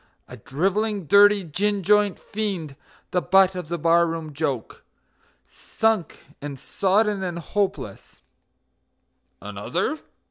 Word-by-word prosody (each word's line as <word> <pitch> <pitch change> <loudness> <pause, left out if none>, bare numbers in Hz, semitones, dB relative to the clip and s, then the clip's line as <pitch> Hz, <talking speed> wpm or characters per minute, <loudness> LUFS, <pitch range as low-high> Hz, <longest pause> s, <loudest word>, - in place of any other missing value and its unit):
A 125 - -10
drivelling, 195 - -1
dirty, 205 +3 +6
gin 195 +5 -1
joint 210 0 +3
fiend, 190 -9 -4 0.4
the 180 - +1
butt 190 +1 +4
of 180 -3 -6
the 170 +2 -3
bar 170 +1 +3
room 165 -2 -5
joke; 140 -6 -4 0.6
Sunk 220 -7 -2 0.2
and 145 -1 -6
sodden 200 - +1
and 175 -2 -3
hopeless 195 +4 -4 1.2
"Another? 310 - -3
185 Hz, 110 wpm, -23 LUFS, 165-205 Hz, 1.2 s, dirty